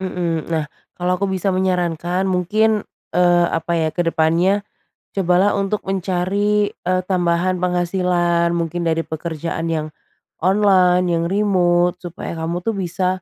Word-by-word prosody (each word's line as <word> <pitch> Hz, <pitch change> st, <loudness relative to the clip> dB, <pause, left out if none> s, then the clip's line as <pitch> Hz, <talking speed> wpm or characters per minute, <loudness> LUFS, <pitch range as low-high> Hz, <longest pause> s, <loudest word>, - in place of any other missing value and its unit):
Mhm, 175 Hz, -4 st, -2 dB
nah 160 Hz, -2 st, 0 dB, 0.3 s
kalau 180 Hz, +1 st, -1 dB
aku 200 Hz, -, -2 dB
bisa 190 Hz, 0 st, -1 dB
menyarankan 180 Hz, 0 st, 0 dB
mungkin, 210 Hz, +4 st, +1 dB, 0.3 s
eee, 175 Hz, -1 st, +4 dB
apa 165 Hz, +1 st, -2 dB
ya 160 Hz, -1 st, +1 dB
kedepannya, 170 Hz, +4 st, +1 dB, 0.5 s
cobalah 190 Hz, +1 st, +2 dB
untuk 200 Hz, +1 st, -2 dB
mencari, 195 Hz, +2 st, 0 dB
e 185 Hz, -, -3 dB
tambahan 180 Hz, 0 st, 0 dB
penghasilan 175 Hz, -1 st, +1 dB
mungkin 170 Hz, +1 st, -2 dB
dari 165 Hz, 0 st, 0 dB
pekerjaan 165 Hz, +1 st, -4 dB
yang, 155 Hz, -1 st, -1 dB, 0.5 s
online, 185 Hz, -1 st, +4 dB
yang 165 Hz, 0 st, 0 dB
remote 180 Hz, -3 st, +2 dB
supaya 175 Hz, -1 st, -6 dB
kamu 170 Hz, +2 st, -3 dB
itu 225 Hz, -, +1 dB
bisa, 180 Hz, -1 st, -2 dB
180 Hz, 125 wpm, -20 LUFS, 170-190 Hz, 0.5 s, eee